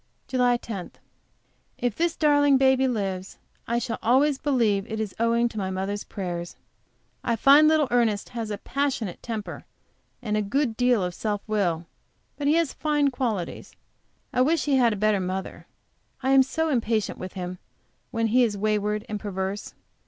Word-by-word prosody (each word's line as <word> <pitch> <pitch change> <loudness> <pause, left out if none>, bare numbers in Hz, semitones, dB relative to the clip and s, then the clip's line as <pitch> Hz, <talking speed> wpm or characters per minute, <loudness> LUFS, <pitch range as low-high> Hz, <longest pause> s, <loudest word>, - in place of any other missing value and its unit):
JULY 250 -2 +3
10. 200 -6 -7 0.9
If 245 -4 -1
this 335 0 0
darling 290 -2 +4
baby 265 0 +4
lives, 195 -5 -3 0.3
I 235 - 0
shall 235 -1 -3
always 265 +4 +3
believe 225 -8 +1
it 220 - -3
is 215 -3 -3
owing 230 +1 +2
to 220 - -6
my 190 -1 -2
mother's 195 +2 -3
prayers. 175 -3 -5 0.7
I 235 - +1
find 280 +6 +6
little 310 -2 +3
Ernest 230 -4 +1
has 230 -3 -5
a 205 - -3
passionate 255 -6 -2
temper, 220 -3 -5 0.6
and 215 -4 -2
a 215 - +2
good 235 +3 0
deal 245 -4 +2
of 180 0 -2
self 205 +2 -3
will. 180 -6 0 0.5
But 285 - -2
he 300 - +4
has 335 -4 +1
fine 295 -2 +1
qualities. 225 -9 -3 0.6
I 250 - +2
wish 305 +2 +2
he 280 -2 +3
had 240 -3 +4
a - - -1
better 210 0 +2
mother. 185 +1 -5 0.6
I 265 - +2
am 270 0 +7
so 320 +5 0
impatient 230 -6 0
with 185 0 -7
him 180 -1 -5 0.5
when 230 0 -1
he 250 0 +6
is 215 -4 0
wayward 210 0 0
and 210 -1 -4
perverse! 195 0 -4
230 Hz, 170 wpm, -25 LUFS, 205-265 Hz, 0.9 s, am